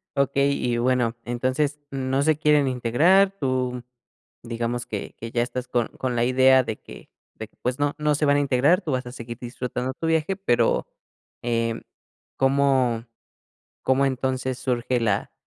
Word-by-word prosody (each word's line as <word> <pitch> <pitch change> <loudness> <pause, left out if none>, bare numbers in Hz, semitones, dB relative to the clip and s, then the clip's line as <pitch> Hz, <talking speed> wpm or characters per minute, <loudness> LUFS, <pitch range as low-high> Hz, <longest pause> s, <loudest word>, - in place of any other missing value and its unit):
Okey, 140 0 +1
y 120 -1 0
bueno, 120 -1 +1
entonces, 130 +5 -1
no 135 0 -1
se 155 -1 +3
quieren 150 -3 +3
integrar, 155 +11 +3
tú, 125 -2 -1 0.6
digamos 120 +1 -3
que 105 -2 -6
que 115 0 -7
ya 120 - +1
estás 125 0 -5
con 120 -2 0
con 125 -2 -3
la 120 - +2
idea 130 +1 +5
de 110 -3 -4
que - - -13 0.3
de 110 - -7
que, - - -36
pues, 125 +2 -2
no 145 +1 0
no 150 -1 +1
se 150 - 0
van 145 0 +4
a - - +3
integrar, 140 +7 +3
tú 160 - -4
vas 130 -1 -1
a 125 - -7
seguir 120 -2 -8
disfrutando 125 +1 -4
tu 165 - -4
viaje, 160 +3 +1
pero, 185 -11 +1 0.6
em, 115 -1 -1 0.5
¿cómo 135 -4 +2 0.8
cómo, 135 +1 +2
entonces, 130 -1 -2
surge 125 -1 -1
la 105 -4 0
130 Hz, 165 wpm, -24 LUFS, 120-140 Hz, 0.8 s, idea